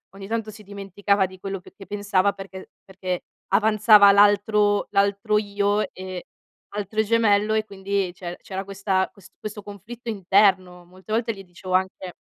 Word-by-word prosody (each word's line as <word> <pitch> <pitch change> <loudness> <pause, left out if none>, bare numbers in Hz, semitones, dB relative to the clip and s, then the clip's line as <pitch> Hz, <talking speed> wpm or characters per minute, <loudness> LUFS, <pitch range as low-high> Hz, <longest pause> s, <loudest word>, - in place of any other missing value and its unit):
ogni 195 0 -9
tanto 225 0 -3
si 215 0 -12
dimenticava 200 0 -1
di 185 0 -11
quello 195 0 -5
che 180 - -17
che 195 - -12
pensava 200 -1 +1
perché 195 -1 -10 0.2
perché 185 -2 -4 0.3
avanzava 210 0 +6
l'altro 205 +1 +3
l'altro 200 +2 +2
io, 205 0 0
ehm, 185 -1 -7 0.5
altro 210 +1 -2
gemello 215 -1 +2
e 220 0 +1
quindi 195 -2 -2
c'er 175 -1 -7
c'era 190 0 -6
questa 195 -1 -1
ques 190 -2 -18
questo 210 0 -7
conflitto 225 +4 -9
interno. 190 -3 +2
Molte 185 +4 -14
volte 230 +1 0
gli 195 -2 -11
dicevo 185 0 -8
anche 185 -1 -2
200 Hz, 155 wpm, -23 LUFS, 190-210 Hz, 0.5 s, avanzava